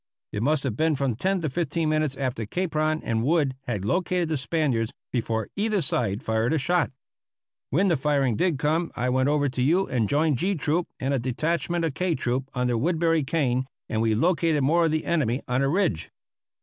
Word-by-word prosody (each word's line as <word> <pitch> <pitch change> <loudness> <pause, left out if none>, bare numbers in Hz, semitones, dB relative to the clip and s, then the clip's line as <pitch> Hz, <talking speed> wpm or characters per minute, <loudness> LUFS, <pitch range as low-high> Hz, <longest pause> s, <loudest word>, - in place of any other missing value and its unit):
It 105 - -3
must 145 +3 +1
have 130 -6 -2
been 160 +3 +2
from 135 -4 -1
ten 190 - 0
to 155 - -1
fifteen 165 +1 -1
minutes 155 -3 0
after 125 -5 -2
Capron 155 - -1
and 110 -1 0
Wood 145 -2 +2
had 105 -6 -2
located 180 - 0
the 160 - 0
Spaniards 130 -6 0 0.2
before 115 -3 -1
either 210 0 +1
side 120 - -1
fired 110 +5 +1
a - - +2
shot. 175 +2 +1 0.8
When 180 +9 +2
the 170 - +3
firing 135 -4 +1
did 175 - +1
come 155 +4 0
I 125 +1 0
went 130 +2 +2
over 145 -1 +2
to 130 0 -3
you 170 +9 +3
and 115 -5 -1
joined 150 -3 +2
G 195 +2 +1
Troop 165 +2 0
and 135 +2 -1
a 135 - +1
detachment 165 +7 -1
of 160 - -2
K 180 +2 0
Troop 125 +2 -2
under 125 -2 0
Woodbury 165 +2 +2
Kane, 130 -4 0 0.2
and 110 - -1
we 110 -1 +2
located 165 +1 +2
more 165 +5 +3
of 160 - +1
the 155 0 -1
enemy 140 -7 0
on 125 +2 +1
a 135 - +2
ridge. 170 - 0
145 Hz, 200 wpm, -25 LUFS, 125-165 Hz, 0.8 s, the